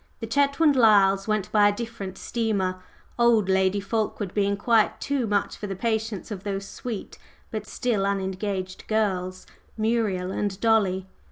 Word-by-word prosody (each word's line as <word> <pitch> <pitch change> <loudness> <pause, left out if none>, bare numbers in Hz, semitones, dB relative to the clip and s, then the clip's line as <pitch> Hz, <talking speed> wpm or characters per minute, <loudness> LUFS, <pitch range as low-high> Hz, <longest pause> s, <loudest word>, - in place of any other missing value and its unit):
The 225 - -4
Chetwynd 280 +5 +3
Lyles 200 -5 +5
went 215 -3 -1
by 205 -1 +5
a - - +4
different 205 -5 -6
steamer, 200 -6 -1 0.4
"old" 235 -4 +4
Lady 190 +1 +2
Fulkeward 205 -1 -2
being 200 -1 +1
quite 225 +1 +2
too 280 -5 -1
much 205 -1 0
for 205 - -5
the 195 - -4
patience 220 -1 -2
of 195 -2 -5
those 195 -1 -3
sweet 225 0 -7 0.3
but 215 -1 -4
still 230 -4 -1
unengaged 190 -1 -3
"girls" 185 -4 -1 0.3
Muriel 215 -5 0
and 200 -1 -2
Dolly. 200 -5 +2
205 Hz, 150 wpm, -25 LUFS, 190-225 Hz, 0.4 s, Lyles